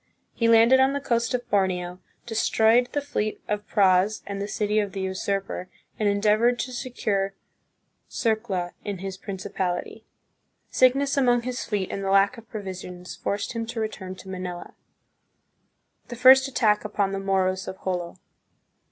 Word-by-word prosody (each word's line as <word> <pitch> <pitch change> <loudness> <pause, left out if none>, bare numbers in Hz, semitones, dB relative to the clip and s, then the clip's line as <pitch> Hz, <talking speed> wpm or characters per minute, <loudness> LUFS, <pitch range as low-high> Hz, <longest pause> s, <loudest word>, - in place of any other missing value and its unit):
He 230 - +1
landed 230 +3 +6
on 265 +1 +4
the 285 - -1
coast 235 -3 0
of 245 - -4
Borneo, 180 -2 0 0.3
destroyed 225 +1 +3
the 290 - -1
fleet 215 -7 -3
of 210 0 -3
praus 195 0 +3
and 200 0 -5
the 200 - -3
city 210 0 0
of 205 -2 -2
the 195 - -4
usurper, 190 0 -3 0.3
and 210 -2 +2
endeavored 215 +4 +3
to 255 +1 -4
se 255 +1 -5
cure 195 -5 -1 0.7
Sirela 215 -6 -1
in 205 -2 -4
his 190 +1 -5
principality. 190 +1 -4 0.7
Sickness 275 +2 +3
among 245 -3 +3
his 250 +1 -3
fleet 205 -4 -2
and 195 - -4
the 195 - -1
lack 195 +4 +4
of 230 - -18
provisions 185 -4 -7
forced 200 +2 -3
him 230 -1 -3
to 235 0 -5
return 190 -4 -4
to 190 - -13
Manila. 180 -2 -6 1.3
The 240 - -7
First 260 +2 +7
Attack 215 -6 +2
upon 205 -2 -1
the 195 - -2
Moros 190 -1 0
of 190 - -8
Jolo. 180 -2 -3
205 Hz, 160 wpm, -25 LUFS, 190-235 Hz, 1.3 s, First